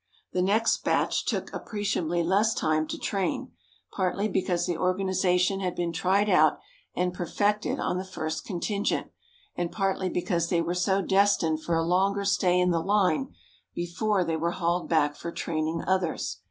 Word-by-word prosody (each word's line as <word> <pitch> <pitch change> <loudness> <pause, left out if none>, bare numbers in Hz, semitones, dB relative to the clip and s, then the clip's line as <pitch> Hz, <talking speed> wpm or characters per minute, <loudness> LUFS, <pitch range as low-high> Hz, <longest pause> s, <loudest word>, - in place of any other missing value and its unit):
The 180 - +1
next 215 +5 +2
batch - - +1
took - - -2
appreciably 185 -5 -1
less 200 +6 +2
time 155 0 +1
to - - -4
train, 195 -2 -2 0.4
partly 195 +2 0
because 180 -3 0
the 175 - -1
organization 185 +1 +1
had 185 -2 -2
been 170 -1 -2
tried 195 +4 +2
out 190 - +4 0.4
and 180 0 0
perfected 205 +4 -1
on 180 - -1
the - - -3
first 160 -4 -4
contingent, 200 +2 -2 0.4
and 175 -1 -2
partly 195 -2 -1
because 170 -2 -1
they 170 - +2
were 170 +1 -1 0.3
destined 190 -5 +2
for 170 +1 -1
a 165 - +1
longer 195 +3 +1
stay 180 -2 +2
in 180 0 +3
the 165 -1 +1
line 205 - +1 0.4
before 185 +3 0
they 165 -1 -1
were 170 +2 -1
hauled 175 0 -1
back 150 -3 +2
for 170 - -6
training 160 0 -2
others. 170 - -1
180 Hz, 160 wpm, -27 LUFS, 170-195 Hz, 0.4 s, out